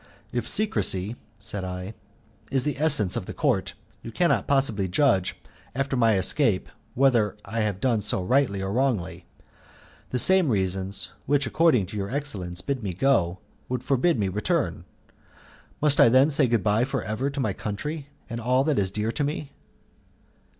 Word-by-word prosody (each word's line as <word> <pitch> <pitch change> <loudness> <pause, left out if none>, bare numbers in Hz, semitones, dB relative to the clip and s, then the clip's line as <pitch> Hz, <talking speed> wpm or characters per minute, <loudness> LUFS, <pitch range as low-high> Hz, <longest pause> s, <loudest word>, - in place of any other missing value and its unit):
"If 120 -1 -3
secrecy," 115 - +1 0.2
said 100 -1 -5
I, 90 +2 -6 0.6
"is 135 -1 0
of 150 - 0
the 140 - -9
essence 140 - +4
of - - -4
the - - -7
Court, - - 0 0.3
you 115 - -8
cannot 175 +8 +1
possibly 125 -9 +1
judge, 95 -2 +2 0.4
after 135 0 -1
my 115 -4 +3
escape, 100 +1 +2 0.3
whether 115 -6 +2
I 115 +3 -4
have 105 -3 -1
done 115 -2 +1
so 95 -2 0
rightly 100 -3 +1
or 95 +1 -3
wrongly. 125 -7 -1 0.8
The 125 - -2
same 185 +4 +5
reasons, 95 -3 -2 0.2
which, 145 0 +2
according 125 - +2
to 100 +4 -8
your 100 -1 -3
excellence, 100 -11 -3
bid 140 +1 -3
me 100 -4 -3
go, 95 -5 +1 0.3
would 125 0 -3
forbid 135 +2 +1
my 100 - +1
return. 100 +2 -1 1.0
Must 150 -1 +3
I - - +7
then 130 +5 +4
say 140 -2 +3
good 115 -4 +1
bye 105 +4 +2
for 135 -2 -2
ever 110 +7 -2
to 140 0 -6
my 110 -7 0
country, 140 - -5 0.2
and 115 -1 -5
all 125 +3 +2
that 150 -4 +1
is 95 -2 0
dear 105 +3 -2
to 145 - -2
me?" 145 0 -4
115 Hz, 170 wpm, -25 LUFS, 100-140 Hz, 1.0 s, I